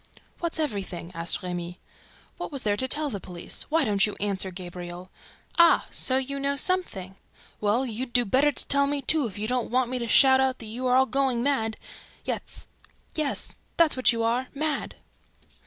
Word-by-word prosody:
"What's 340 -1 -2
everything?" 200 - -3
asked 165 +3 0
Remy. 175 0 -5 0.6
"What - - -5
was 275 -3 -1
there 205 -1 +1
to 260 +5 0
tell 295 +2 +1
the 200 - -4
police? 175 -2 -4
Why 315 -1 +3
don't 200 -3 +2
you 210 - -5
answer, 195 -2 -1
Gabriel?... 180 0 -8 0.5
Ah, 340 0 +6
so 260 - +2
you 275 +1 -2
know 280 0 +1
something! 235 - +1 0.4
Well, 215 +5 +1
you 230 -3 -5
would 240 - -20
do 245 -1 +4
better 270 +8 +3
to - - -1
tell 280 0 +3
me, 285 -1 -1
too, 305 -5 +2
if 200 - -10
you 210 +1 -3
don't 250 0 -1
want 250 0 +1
me 255 - -1
to 235 - -3
shout 265 +2 +6
out 265 -1 +2
that 225 - -8
you 240 +4 -3
are 250 - +3
all 260 +1 +5
going 265 -3 0
mad!... 225 -6 0 0.5
Yes, - - -4 1.1
that's 330 -2 +4
what 255 -1 +4
you 230 -1 -1
are: 240 +3 0
mad!" 300 0 -2
250 Hz, 190 wpm, -26 LUFS, 200-275 Hz, 1.1 s, Ah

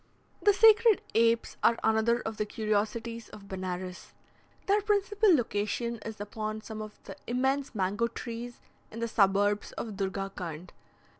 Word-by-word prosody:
The 415 - +6
sacred 440 +1 +6
apes 230 0 +2
are 230 - +4
another 220 +2 +2
of 220 -1 -5
the 215 - 0
curiosities 220 +2 -2
of 200 -1 -12
Benares. 185 -1 -5 0.5
Their 410 +1 +3
principal 410 0 +2
location 235 -1 -1
is 220 -1 -7
upon 215 +1 -4
some 215 0 -7
of 215 -1 -8
the - - -9
immense 265 +2 0
mango 205 +4 0
trees 235 0 -7 0.3
in 230 - -8
the 230 - -1
suburbs 205 -1 +2
of 215 -4 -6
Durgakund. 190 -4 -4
220 Hz, 140 wpm, -29 LUFS, 205-240 Hz, 0.5 s, The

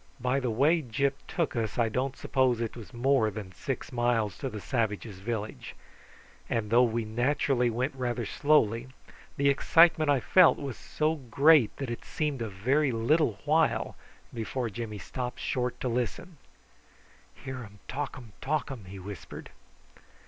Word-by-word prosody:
By 125 +2 +1
the 125 -2 -1
way 145 +9 +3
Gyp 135 +2 0
took 170 -6 -1
us 110 -3 -2
I 120 -2 +3
don't 130 +4 -2
suppose 130 -3 +1
it 115 -2 -3
was 115 -4 -10
more 125 -2 +2
than 105 -2 -7
six - - -5
miles 120 -4 +1
to 135 - -3
the 110 -3 -6
savages' 110 -4 -2
village; 110 +1 -5 0.7
and 110 -2 -1
though 120 +1 +6
we 115 -2 +1
naturally 125 +2 +1
went 125 +5 -1
rather 120 -2 -2
slowly, 125 -4 +2 0.5
the 140 0 +2
excitement 155 +2 +4
I 140 -2 +4
felt 180 +7 +5
was 135 -4 -5
so 155 +1 -1 0.2
great 145 -2 +5
that 135 -4 -4
it 120 - -6
seemed 150 -5 -2
a 115 - -2
very 130 +9 +1
little 115 0 +2
while 155 +1 +2 0.4
before 120 0 -3
Jimmy 110 -1 -5
stopped 125 +4 -5
short 125 -1 -2
to - - -1
listen. 125 +8 -3 1.0
"Hear 130 -1 -7
um 105 -4 -10
talkum 130 -4 -5
talkum," 135 -6 -2
he 95 +1 -9
whispered. 95 -5 -9
125 Hz, 155 wpm, -29 LUFS, 110-140 Hz, 1.0 s, though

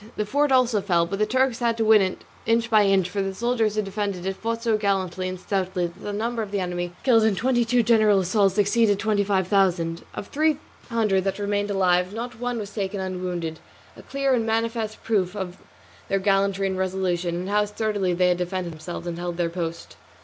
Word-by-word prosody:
The 210 - -1
fort 285 +6 +1
also 250 -5 +3
fell; 175 -4 +2
but 195 +4 -4
the 215 - +2
Turks 260 +1 +1
had 235 -2 +1
to 225 - +1
win 215 -1 +6
it 185 -1 -2 0.2
inch 230 +1 +2
by 215 -2 +5
inch, 195 -2 +3
for 200 +2 -2
the 195 0 -3
soldiers 230 -1 0
who 215 - +1
defended 195 -2 -3
it 190 0 -2
fought 230 +3 -3
so 230 -2 +2
gallantly 190 -3 -1
and 185 0 -6
stoutly 185 -2 -1
that 170 +2 -8
the 205 - -4
number 230 +3 -2
of 210 - -4
the 200 0 -2
enemy 175 -1 -3
killed 230 -4 +5
in 220 -2 +3
twenty 240 +3 +2
two 240 +1 +2
general 215 -3 +4
assaults 195 +1 +2
exceeded 205 0 +3
twenty 210 -1 +1
five 190 -2 0
thousand. 175 -4 +1
Of 200 - -6
three 310 0 +2 0.3
hundred 215 -5 +1
that 195 - -1
remained 205 0 -1
alive 185 0 +2
not 235 0 -6
one 245 0 -2
was 210 -2 -6
taken 200 -1 -3
unwounded, 180 -3 -4 0.4
a - - -12
clear 275 -1 0
and 235 -3 +2
manifest 225 -1 -2
proof 200 -4 0
of 190 -3 -5 0.5
their 195 - +1
gallantry 195 0 +1
and 190 -1 -1
resolution, 185 -2 -1
and 180 +2 -4
how 210 0 +2
sturdily 210 -3 -1
they 180 0 +3
had 180 - +2
defended 180 -1 -3
themselves 165 +2 -7
and 170 -1 -4
held 175 -1 -4
their 170 -1 0
post. 170 -1 -5
200 Hz, 215 wpm, -24 LUFS, 185-225 Hz, 0.5 s, win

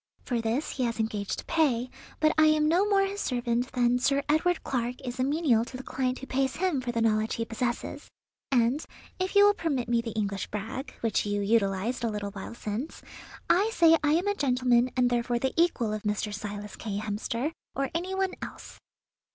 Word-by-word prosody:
For 240 -3 -1
this 230 +6 -1
he 260 - -2
has 230 -1 -2
engaged 210 -2 -2
to - - -7
pay, 255 -7 +1 0.3
but 310 0 +4
I 315 - +5
am 305 0 +4
no 365 +6 +3
more 390 -1 +4
his 400 +1 -4
servant 245 0 -1
than 245 -1 +3
Sir 275 +2 +2
Edward 320 +4 +2
Clark 245 -1 -1
is 250 +1 -5
a - - +3
menial 275 -5 +2
to 255 - -8
the 260 - -8
client 255 -1 -1
who 270 - -8
pays 265 0 0
him 350 -7 0
for 245 -1 -3
the 230 -1 0
knowledge 215 0 +1
he 230 - -2
possesses; 240 +1 -3 0.4
and, 250 +3 +2 0.4
if 370 +2 -2
you 405 0 +8
will 410 - +6
permit 285 - -1
me 235 0 +2
the 230 - -5
English 200 -3 -2
brag, 220 +6 -5
which 220 -2 0
you 205 0 0
utilized 205 +3 +1
a 230 - +1
little 205 -1 -4
while 200 +3 -8
since, 230 +7 -5 0.4
I 400 +5 +4
say 330 -6 +6
I 295 0 +3
am 350 +5 +1
a 405 - +3
gentleman 250 -6 +2
and 245 -1 +3
therefore 240 0 +1
the 265 +2 -1
equal 295 -11 +2
of 215 - -3
Mr. 210 0 -2
Silas 205 0 -6
K. 205 -3 -4
Hemster, 215 +6 -2 0.2
or 275 +2 -1
any 360 +3 -2
one 380 -1 0
else." - - -9
250 Hz, 210 wpm, -28 LUFS, 225-305 Hz, 0.4 s, you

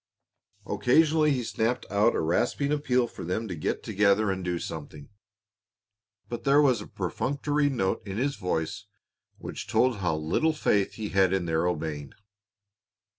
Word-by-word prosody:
Occasionally 155 +4 +3
he 130 -4 0
snapped 115 +2 -1
out 105 +3 +3
a - - 0
rasping 120 - 0
appeal 125 -4 +2
for 120 - -9
them 90 +7 -2
to 95 - -4
get 80 - -3
together 100 +1 +2
and 95 -1 -4
do 90 -1 -1
something, 75 -3 -7 1.2
but 120 -1 -6
there 140 +1 +5
was 130 -7 +3
a - - -9
perfunctory 145 - -1
note 95 -9 -1
in 100 0 -6
his 140 +4 0
voice 90 +3 -3 0.5
which - - -7
told 125 -3 +2
how 90 -5 0
little 80 - +1
faith 100 -9 +1
he 110 -2 -5
had 95 -1 +3
in 95 -2 0
their 80 +1 +1
obeying. 75 -4 -3
105 Hz, 155 wpm, -27 LUFS, 90-130 Hz, 1.2 s, there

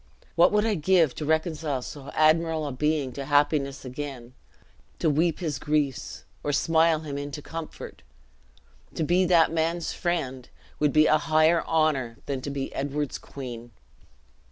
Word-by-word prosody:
What 175 0 +5
would 210 +1 +2
I 225 - +2
give 165 -4 +3
to 155 - -5
reconcile 160 -3 -1
so 140 +1 -8
admirable 160 0 +3
a 145 - -3
being 150 0 0
to 140 - -5
happiness 145 -1 +1
again 130 -2 -7 0.6
to 160 - +2
weep 160 +2 +1
his 150 -6 -2
griefs, 150 -3 -2 0.2
or 145 - -1
smile 160 +2 +3
him 145 -3 -5
into 145 0 -5
comfort! 165 -1 -8 0.9
To 160 - -1
be 175 +4 +3
that 170 -3 +4
man's 165 +1 -1
friend, 135 -8 -3 0.3
would 150 -1 +2
be 155 +1 +5
a 155 - +4
higher 160 +1 +3
honor 150 -8 +1
than 135 -2 -3
to 140 - -5
be 140 -1 -4
Edward's 145 +1 -3
queen." 120 -3 -8
150 Hz, 155 wpm, -26 LUFS, 140-165 Hz, 0.9 s, What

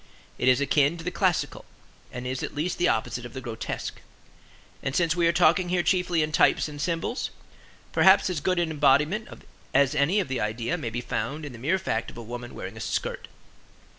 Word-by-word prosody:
It - - +1
is 130 0 +5
akin 145 +3 +2
to 165 - -8
the 180 - -2
classical, 180 -2 0 0.5
and 125 0 -6
is 130 0 -3
at - - -5
least 160 +5 -2
the 175 - +3
opposite 120 +1 -1
of 120 - -9
the 130 - -5
grotesque. 120 -3 -5 0.8
And 135 - -3
since 170 -1 +2
we 170 -1 +3
are - - +5
talking 175 +1 +3
here 180 -1 +1
chiefly 180 -3 +2
in 155 - -2
types 155 - +3
and 145 -1 -7
symbols, 170 - -2 0.6
perhaps 190 +1 +6
as 180 -5 -1
good 185 +2 +1
an 170 -2 +1
embodiment 150 +8 +3 0.5
as 140 0 +4
any 155 +8 +2
of 195 - -1
the 130 -1 -2
idea 115 +2 -1
may 115 - -4
be 120 +2 -4
found 135 +7 -3
in 145 - -7
the 120 - -10
mere 155 +10 +1
fact 115 -11 -2
of - - -13
a 120 - -7
woman 120 +2 -7
wearing 100 +4 -7
a - - -7
skirt. - - -3
150 Hz, 210 wpm, -26 LUFS, 125-175 Hz, 0.8 s, perhaps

